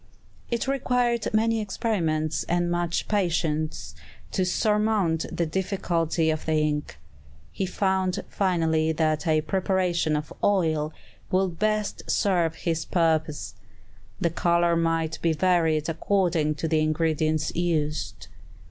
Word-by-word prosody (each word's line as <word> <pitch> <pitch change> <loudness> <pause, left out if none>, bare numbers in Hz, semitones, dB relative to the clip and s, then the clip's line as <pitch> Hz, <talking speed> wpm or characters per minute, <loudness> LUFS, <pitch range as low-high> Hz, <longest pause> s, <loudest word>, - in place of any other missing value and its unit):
It 235 +1 -1
required 245 -3 0
many 225 +1 +2
experiments 165 -7 -1
and 175 0 0
much 175 -1 -1
patience 160 -6 -1 0.4
to 190 - +1
surmount 210 -3 +1
this 170 - -1
difficulty 170 -3 0
of 155 0 -4
the 160 - +1
ink. 150 - -1 0.5
He 190 - -2
found 190 -1 0
finally 160 -4 +1
that 155 0 0
a 155 -1 +3
preparation 180 -1 0
of 150 0 -4
oil 160 -6 +2 0.4
would 185 -2 0
best 215 0 0
serve 175 -5 +1
his 165 -1 -2
purpose. 160 -3 0 0.7
The 170 - +1
color 170 0 +2
might 165 -1 0
be 165 -1 +2
varied 160 -2 +2
according 165 -2 +1
to 155 +2 -3
the 160 0 +2
ingredients 155 0 0
used. 155 -3 -1
170 Hz, 120 wpm, -25 LUFS, 155-190 Hz, 0.7 s, a